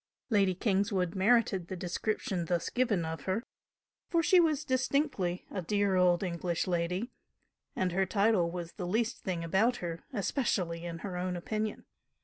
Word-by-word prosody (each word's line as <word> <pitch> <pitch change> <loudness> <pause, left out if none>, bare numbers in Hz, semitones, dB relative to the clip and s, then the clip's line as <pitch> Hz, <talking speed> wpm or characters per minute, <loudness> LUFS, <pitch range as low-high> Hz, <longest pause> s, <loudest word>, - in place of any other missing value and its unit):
Lady 195 -3 +3
Kingswood 190 -3 +1
merited 195 -3 +3
the 190 - -4
description 180 0 -2
thus 170 0 -1
given 225 -9 +1
of 160 -2 -5
her, 195 +5 0 0.7
for 335 -2 +2
she 365 +3 +6
was 315 -4 +2
distinctly 255 - 0
a 190 - -3
dear 200 +2 +1
old 180 0 +4
English 175 -1 -1
lady, 180 +6 -1 0.6
and 185 -1 0
her 190 +2 +1
title 200 -3 +3
was 170 -1 -5
the 180 -4 -5
least 225 +5 0
thing 175 -4 -3
about 195 +9 +2
her, 170 -4 -5
especially 190 - -1
in 170 -1 -4
her 185 -3 -4
own 180 0 -2
opinion. 215 +4 -3
190 Hz, 155 wpm, -31 LUFS, 175-220 Hz, 0.7 s, she